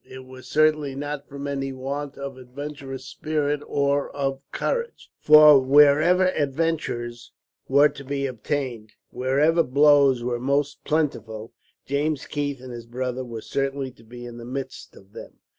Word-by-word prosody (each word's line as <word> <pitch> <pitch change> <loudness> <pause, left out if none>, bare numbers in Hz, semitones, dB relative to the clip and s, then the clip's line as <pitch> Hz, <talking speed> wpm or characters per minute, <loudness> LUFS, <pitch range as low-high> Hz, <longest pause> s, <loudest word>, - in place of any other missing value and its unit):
It 130 0 -11
was 130 0 -13
certainly 155 -2 +2
not 145 0 -5
from 140 0 -7
any 135 -1 -3
want 140 +2 -5
of 140 -1 -6
adventurous 135 +1 -8
spirit, 150 -2 -2
or 140 0 0
of 135 -1 -2
courage, 475 -1 -3
for 150 -1 +8
wherever 150 +7 +5
adventures 140 -7 -2 0.4
were 140 +2 +5
to 140 - -11
be 140 0 -3
obtained, 125 -3 -4 0.2
wherever 140 +7 +2
blows 140 -3 +4
were 120 -1 -2
most 140 +3 -1
plentiful, 115 -8 -2 0.3
James 145 +1 -1
Keith 145 -3 -3
and 130 -1 -9
his 120 -1 -9
brother 125 +1 -3
were 115 -3 -7
certain 135 0 -3
to 115 - -20
be 120 +2 -10
in 120 0 -9
the - - -9
midst 130 +2 -7
of 100 +1 -18
them. - - -10
140 Hz, 150 wpm, -24 LUFS, 130-145 Hz, 0.4 s, for